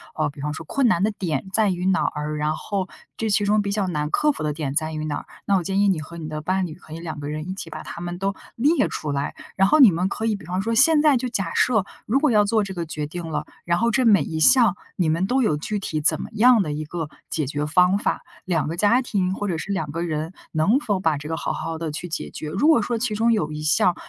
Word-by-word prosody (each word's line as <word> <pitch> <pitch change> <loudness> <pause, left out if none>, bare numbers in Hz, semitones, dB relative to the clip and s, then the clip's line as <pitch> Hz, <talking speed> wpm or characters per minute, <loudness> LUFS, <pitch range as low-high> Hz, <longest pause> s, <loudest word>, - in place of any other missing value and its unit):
呃， 155 -1 0
比 140 -1 -11
方 150 +1 -2
说 160 - -8
困 270 - +1
难 180 -6 +2
的 215 - +2
点 170 -8 -3
在 220 -2 +3
于 180 -1 -2
哪 190 0 +2
儿？ 150 0 -2
然 150 +1 0
后 195 0 -3 0.3
这 225 - -1
其 205 0 +2
中 210 +1 +3
比 200 -1 -2
较 200 -2 0
难 150 -4 -2
克 300 - +2
服 - - -6
的 150 - 0
点 145 -3 -3
在 155 0 0
于 155 0 -3
哪 145 -2 -2
儿？ - - -8 0.2
那 200 - +2
我 185 - +1
建 195 +3 -1
议 205 - +4
你 185 -5 +1
和 170 +2 -10
你 160 -2 -6
的 155 0 -5
伴 185 +4 0
侣 160 -3 -7
可 155 -3 -13
以 165 - -6
两 160 -3 -6
个 145 0 -5
人 155 +2 -4
一 - - -2
起 195 - -7
把 - - -7
它 170 - -8
们 175 0 -4
都 195 +2 -1 0.2
列 295 +8 +3
出 150 - -4
来， 140 0 -2 0.2
然 195 0 +4
后 310 - +5
你 250 -8 +9
们 180 +3 0
可 220 - -3
以 220 -2 +1
比 200 - -10
方 180 +2 -2
说 230 +3 -1
现 295 +6 +5
在 295 -4 +5
就 250 +1 -3
假 195 -7 -2
设， 220 -6 +3 0.2
如 255 +6 +3
果 300 -2 +2
要 210 -2 +5
做 215 +1 +2
这 195 -1 -5
个 175 -2 -3
决 155 -1 -4
定 170 +3 -6
了， 155 - -3 0.2
然 170 0 +2
后 235 +1 +2
这 255 +2 +2
每 200 -9 +5
一 160 +2 -4
项 230 - +6 0.2
你 175 - +1
们 165 +4 +1
都 260 +4 +2
有 185 -9 +2
具 205 +8 -3
体 155 -5 -3
怎 - - +3
么 - - -6
样 235 +1 +5
的 150 - -4
一 150 +1 -3
个 160 -1 -5 0.2
解 155 - -1
决 145 +2 -2
方 180 +5 +4
法？ - - -1 0.2
2 165 -5 0
个 165 - -3
家 210 +7 +3
庭 190 -6 0
或 205 - -3
者 175 -4 -1
是 200 - -5
2 160 -7 -2
个 165 +3 -3
人， 160 0 -3 0.2
能 175 - +3
否 210 -9 -1
把 160 -5 +1
这 150 +1 -8
个 160 - -2
好 - - -2
好 165 +1 -4
地 160 -1 -4
去 160 +4 -5
解 160 - -4
决？ 155 - -6
如 195 - +1
果 315 -8 +5
说 235 +3 -1
其 225 -1 -1
中 225 +2 +2
有 175 -9 0
一 150 0 -5
项， 155 +3 +3
180 Hz, 310 characters per minute, -23 LUFS, 155-210 Hz, 0.3 s, 你